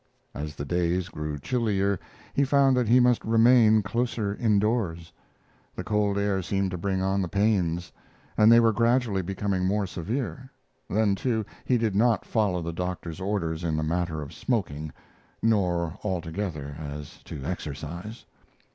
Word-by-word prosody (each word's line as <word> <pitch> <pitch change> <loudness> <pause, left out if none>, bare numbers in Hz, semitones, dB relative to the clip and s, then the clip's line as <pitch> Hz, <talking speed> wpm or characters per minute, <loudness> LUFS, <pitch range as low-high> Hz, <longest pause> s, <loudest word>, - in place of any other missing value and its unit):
As 75 +1 -5
the 70 - -5
days 90 +3 0
grew 75 -1 -4
chillier 100 - 0 0.3
he 140 - +2
found 140 -1 +4
that 125 -2 +1
he 120 +3 +6
must 125 -1 +3
remain 115 -1 +5
closer 115 -1 -1
indoors. 105 -7 0 0.6
The - - -4
cold 105 -1 +1
air 100 -1 +1
seemed 95 +1 -1
to 90 - -3
bring 95 +1 -1
on 95 +1 +1
the 90 - -1
pains, 90 -3 0 0.4
and 110 +1 +6
they 115 - +8
were 115 -1 +4
gradually 115 -2 +2
becoming 95 +1 -2
more 100 +2 +1
severe; 125 +9 -4 0.4
then, 105 0 +2
too, 110 +1 -1 0.2
he 125 - +3
did 110 -4 0
not 115 -1 +3
follow 100 -6 0
the 85 0 -4
doctor's 90 -1 -4
orders 90 -5 -2
in 80 -2 0
the 80 - 0
matter 80 -1 -1
of 75 +3 -10
smoking, 80 - -2 0.5
nor 90 -7 +1
altogether 85 -6 -3
as 75 -1 -8
to 70 - -7
exercise. 85 - -6
100 Hz, 155 wpm, -26 LUFS, 85-110 Hz, 0.6 s, they